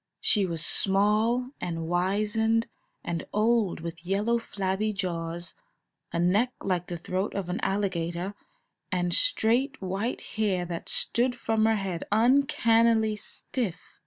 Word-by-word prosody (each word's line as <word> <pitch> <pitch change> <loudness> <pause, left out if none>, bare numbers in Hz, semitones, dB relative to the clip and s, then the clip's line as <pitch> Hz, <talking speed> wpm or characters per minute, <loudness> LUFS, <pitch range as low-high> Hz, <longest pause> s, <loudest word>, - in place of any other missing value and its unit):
She 200 -4 +3
was 165 -2 -2
small 215 +7 +2
and 165 -2 -3
wizened 210 +6 +1 0.4
and 170 -1 -3
old, 215 -5 +2
with 165 0 -7
yellow, 205 +6 +1
flabby 200 -1 -2
jaws, 170 -3 -3 0.6
a - - -2
neck 200 +9 +2
like 180 -2 -1
the 175 - -4
throat 185 +4 -3
of 195 -3 -3
an 180 - -2
alligator, 185 -2 -1 0.6
and 175 -2 0
straight, 265 - +2
white 195 +5 -2 0.2
hair 195 -5 +1
that 170 -1 -5
stood 245 +1 +1
from 220 -2 +1
her 225 - +3
head 190 -5 -3
uncannily 230 -2 +4
stiff. 210 -1 -4
200 Hz, 130 wpm, -27 LUFS, 175-225 Hz, 0.6 s, uncannily